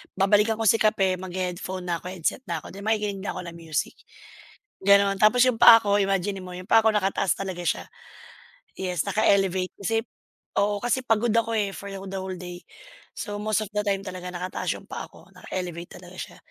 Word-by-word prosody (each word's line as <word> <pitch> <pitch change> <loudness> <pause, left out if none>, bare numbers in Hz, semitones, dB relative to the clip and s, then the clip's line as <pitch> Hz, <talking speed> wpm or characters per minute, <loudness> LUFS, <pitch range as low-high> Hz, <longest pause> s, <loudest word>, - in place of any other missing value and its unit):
babalikan 210 +3 +3
ko 225 - -3
si 225 +1 +4
kape, 195 -4 +2
maghe-headphone 185 0 -4
na 170 -2 -1
'ko, 180 - -9
headset 185 +7 -2
na 170 -1 -2
ako, - - -10
'di 195 - -9
makikinig 210 -2 0
na - - -3
ako - - -4
ng - - -13
music, 165 -2 -3 0.9
ganun. 200 0 +5
Tapos 215 +4 +5
yung 250 -3 +1
paa 230 -1 +10
ko, 205 -1 +2
imaginin 195 0 -1
mo, 180 - -8
yung 185 +1 -10
paa 225 - +7
ko 220 - +5
nakataas 195 -2 +1
talaga 190 -2 -4
siya. - - 0 1.0
Yes, 180 -3 -1
naka-elevate 195 -2 +2
kasi 215 +3 -1 0.6
oo 205 0 +2
kasi 245 +2 0
pagod 225 -1 +2
ako, 230 0 +2
eh, 205 -2 0
for 200 0 -8
the 195 - -6 0.2
whole 190 0 -5
day. 180 0 -9 0.6
So, 205 - -4
most 215 0 0
of - - -7
the 210 - +1
time 200 -2 0
talaga 180 -2 -7
nakataas 180 +1 -3
yung - - -18
paa - - -5
ko, - - -17
naka-elevate 175 -2 -6
talaga - - -13
siya. - - -7
195 Hz, 195 wpm, -25 LUFS, 185-210 Hz, 1.0 s, paa